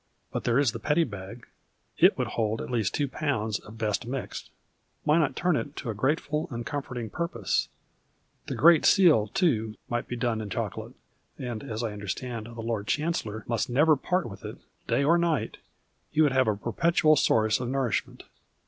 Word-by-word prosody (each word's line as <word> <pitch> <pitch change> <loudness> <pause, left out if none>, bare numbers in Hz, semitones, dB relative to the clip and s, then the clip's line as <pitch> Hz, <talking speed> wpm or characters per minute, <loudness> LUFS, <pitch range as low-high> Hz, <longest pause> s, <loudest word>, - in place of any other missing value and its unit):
But - - -4
there 120 0 +3
is 140 -5 +3
the 115 - -6
Petty 155 +5 +2
liag. 100 +1 -9 0.6
It - - +6
would - - -1
hold 110 0 -1
at - - -6
least 115 -6 0
2 145 - 0
lb. 125 -7 -1
of 110 +2 -12
best 110 0 -1
mixed. 135 0 -5 0.5
Why 150 +3 +4
not 150 -4 +1
turn 180 -2 +1
it 145 0 -3
to 120 - -4
a - - -4
grateful 150 - 0
and 120 -2 -5
comforting 125 -6 -4
purpose? 120 - -1 0.8
The - - -3
Great 165 0 +6
Seal, 160 - +5
too, 110 - 0
might 120 0 -2
be 120 - -4
done 115 -2 -1
in 105 - -6
chocolate, - - -4 0.4
and 120 -3 -5
as 115 -3 -4
I 110 -2 -2
under 105 0 -8
stand 115 +2 -4
the 115 -1 -8
Lord 110 -2 -3
Chancellor 145 -9 -2
nnist 120 +3 -1
never 150 +5 +5
part 180 +4 -1
with 100 - -10
it, - - -7 0.3
day 140 - +2
or 165 +4 +4
night, 170 -4 0 0.5
he 155 - +2
would 145 - +3
have 130 -2 +3
a 105 - +2
perpetual 155 - +2
source 110 -6 +3
of 125 -1 -3
nourishment. 130 -5 -1
120 Hz, 190 wpm, -27 LUFS, 110-150 Hz, 0.8 s, It